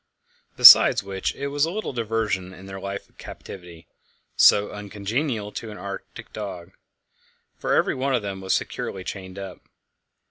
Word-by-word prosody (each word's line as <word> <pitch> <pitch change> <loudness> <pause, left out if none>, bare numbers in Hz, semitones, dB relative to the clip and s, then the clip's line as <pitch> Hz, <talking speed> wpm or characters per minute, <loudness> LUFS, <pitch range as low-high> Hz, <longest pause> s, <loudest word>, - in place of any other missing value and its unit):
Besides - - +9
which, 95 -1 -4
it 140 +1 -4
was 145 0 0
a 165 - +2
little 210 -3 -4
diversion 110 -5 -2
in 95 - -13
their 95 0 -8
life 100 +1 -6
of - - -34
captivity, 85 -4 -11 0.5
so 105 0 +5
uncongenial 105 +3 -4
to 115 - -7
an 105 - -9
Arctic 100 -1 -9
dog; 95 -4 -7 0.9
for - - 0
every - - +2
one 130 +1 -1
of 120 - -2
them 95 -1 -5
was 95 0 0
securely 95 - -4
chained 95 0 -8
up. 95 -2 -8
100 Hz, 155 wpm, -23 LUFS, 95-115 Hz, 0.9 s, Besides